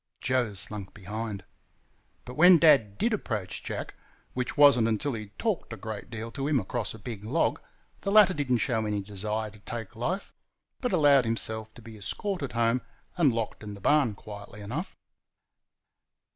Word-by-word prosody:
Joe 125 -4 0
slunk 100 0 -1
behind. 105 0 -5 0.8
But 125 - -8
when 175 +5 +8
Dad 135 -11 +5
DID 230 0 +1
approach 105 - -3
Jack, - - -5 0.4
which 125 +2 -3
was 145 -1 +8
n't 115 -2 +2
until 115 +5 0
he 110 -2 -5
had 105 +1 -23
talked 215 - -2
a 110 - -5
great 110 -2 -7
deal 115 0 -6
to 135 +3 -3
him 145 -3 +3
across 115 +3 -3
a - - -9
big 110 -1 -7
log, 135 +10 0 0.4
the 195 - -2
latter 205 -3 +7
did 145 -5 -2
n't 120 - +3
show 115 -5 +1
any 105 -1 -1
desire 105 +2 -3
to 105 - -16
take 115 +1 -7
life, 170 - -3 0.5
but 250 -2 -1
allowed 145 -7 +5
himself 110 -1 -1
to 120 - -13
be 110 -1 -11
escorted 145 - -2
home 115 +1 +2 0.3
and 165 -7 +4
locked 115 -2 -3
in 105 -1 -7
the - - -11
barn 130 -1 +3
quietly 105 0 -10
enough. 130 - -5
115 Hz, 180 wpm, -28 LUFS, 105-145 Hz, 0.8 s, when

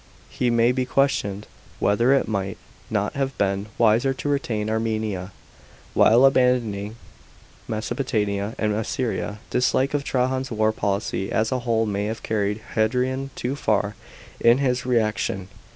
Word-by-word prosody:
It 125 - +3
may 120 0 +4
be 130 0 0
questioned 105 -8 0 0.3
whether 115 +5 +3
it 140 - +3
might 100 -3 -2 0.3
not 105 -1 -1
have 135 -1 -2
been 100 +1 0
wiser 120 +4 +3
to 145 - -3
retain 115 -7 -1
Armenia, 110 -4 -2 0.6
while 120 +4 +6
abandoning 120 -6 +2 0.7
Mesopo 115 +4 -3
tamia 105 -4 -1
and 105 -1 0
Assyria. 110 -1 -2
Dislike 130 +2 +2
of 145 -1 0
Trajan's 130 0 0
war 110 -1 +1
policy 100 -2 -2
as 110 +1 +1
a 130 - 0
whole 115 -2 +1
may 100 -1 -1
have 110 +2 -4
carried 105 0 -1
Hadrian 125 +4 0
too 125 +3 -2
far 105 -6 0 0.5
in 115 +1 +5
his 125 -2 0
reaction. 110 -5 0
110 Hz, 140 wpm, -23 LUFS, 105-125 Hz, 0.7 s, while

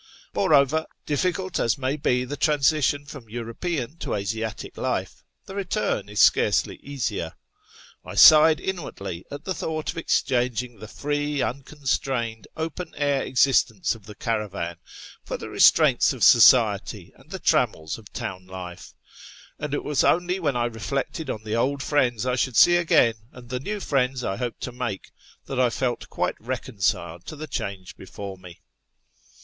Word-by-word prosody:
Moreover, 150 +1 +3 0.2
difficult 180 +5 -1
as 115 +4 +1
may 135 +1 -1
be 125 -4 0
the 140 +3 -5
transition 145 -1 +2
from 140 -6 -11
European 120 - -4
to - - -3
Asiatic 110 +2 -4
life, - - -3 0.2
the - - -9
return 195 - -2
is 105 - -4
scarcely - - +3
easier. 115 -12 -3 0.7
I - - -9
sighed 155 0 +8
inwardly 100 - -5
at 145 +1 -8
the 185 - -2
thought 155 -2 -3
of 165 - -6
exchanging 125 -6 0
the 110 - -9
free, 145 +3 -2
unconsLrained, 130 -4 -2
open 160 +2 -5
air 145 -2 +1
existence 125 -5 +2
of 110 -3 -14
the 105 - -10
caravan 100 -7 -3 0.5
for - - -4
the - - -8
restraints - - +5
of - - -4
society - - +5
and - - -21
the - - -5
trammels 80 +5 0
of 105 - -15
town 95 -1 -6
life; 90 -1 -9 0.6
and 150 -1 -4
it 145 - -2
was 150 -2 +1
only 180 +2 +2
when 145 -7 0
I 120 -1 +1
reflected 130 - -3
on 110 - -4
the 110 0 -3
old 140 +4 0
friends 125 -6 +1
I 125 0 0
should 125 -2 0
see 175 - +7
again, 165 -9 +4 0.2
and 120 -1 -13
the 125 0 -2
new 205 +10 -4
friends 135 -6 0
I 95 - -2
hoped 120 -2 -4
to 125 - -4
make, 120 -5 -5 0.3
that 135 - -4
I 125 -1 +4
felt 120 +1 -2
quite - - -2
reconciled 100 -8 -2
to - - -6
the 155 +1 -6
change 100 -10 -5
before 95 +1 -8
me. 90 -2 -13
125 Hz, 160 wpm, -24 LUFS, 110-150 Hz, 0.7 s, sighed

